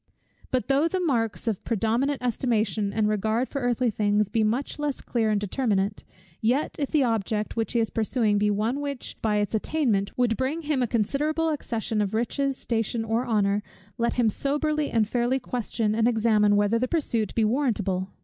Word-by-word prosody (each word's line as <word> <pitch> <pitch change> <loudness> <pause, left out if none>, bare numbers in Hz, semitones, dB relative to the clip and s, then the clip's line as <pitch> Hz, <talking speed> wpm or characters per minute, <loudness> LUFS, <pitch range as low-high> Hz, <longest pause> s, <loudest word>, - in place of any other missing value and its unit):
But 255 -1 -1
though 280 +3 +3
the 370 +3 -1
marks 240 - -1
of 215 -4 -1
predominant 235 +5 0
estimation 220 -4 0
and 215 +1 +1
regard 220 +4 0
for 275 - -3
earthly 245 -1 +1
things 205 -1 +1
be 220 +1 +1
much 240 +8 -1
less 295 -2 -2
clear 225 -3 -1
and 210 -1 +2
determinate; 205 -1 -1 0.4
yet 250 +7 +1
if 285 - -1
the 300 -3 +3
object 220 -2 -1
which 225 -1 -2
he 235 - +2
is 225 - 0
pursuing 220 -2 +1
be 210 0 +2
one 220 +6 0
which, 280 -3 -5
by 215 -2 +1
its 205 0 0
attainment, 220 -4 0
would 245 -2 +2
bring 280 +6 -2
him 295 -3 0
a 245 - +1
considerable 295 +9 0
accession 230 -7 -2
of 205 +1 -1
riches, 270 +4 0
station, 225 0 -1
or 225 +3 0
honour, 205 -2 +2 0.4
let 235 0 +1
him 240 -2 +3
soberly 295 +6 0
and 220 -2 +2
fairly 245 +3 +1
question 230 -3 -2
and 225 +1 +2
examine 215 -3 +3
whether 205 +3 +2
the 255 - 0
pursuit 235 - -1
be 225 - +3
warrantable? 210 -7 0
230 Hz, 185 wpm, -26 LUFS, 210-260 Hz, 0.4 s, though